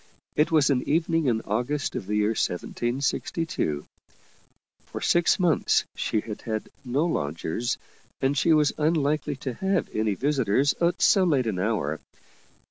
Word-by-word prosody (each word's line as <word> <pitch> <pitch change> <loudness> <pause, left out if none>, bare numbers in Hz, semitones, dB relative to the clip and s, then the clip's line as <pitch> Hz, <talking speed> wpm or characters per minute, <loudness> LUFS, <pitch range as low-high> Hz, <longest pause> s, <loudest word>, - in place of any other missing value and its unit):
It 150 - +3
was 150 -3 +4
an 130 -2 +2
evening 165 0 +1
in 115 -3 +1
August 125 +8 -2
of 95 - -4
the 105 - -1
year 105 0 +2
1762. 120 - -2 1.0
For - - -6
six 175 -1 +3
months 175 -4 +2
she 110 - -1
had 105 -1 -7
had 110 -1 -4
no 135 +5 0
lodgers, 80 - -2 0.4
and 135 +2 +1
she 165 +4 +2
was 150 -2 +4
unlikely 150 -2 +1
to 130 - -1
have 190 +7 -1
any 110 -2 +1
visitors 135 0 +2
at 170 +1 +1
so 195 - +5
late 145 -8 +2
an 105 -5 -2
hour. 90 -7 -1
135 Hz, 145 wpm, -26 LUFS, 110-155 Hz, 1.0 s, so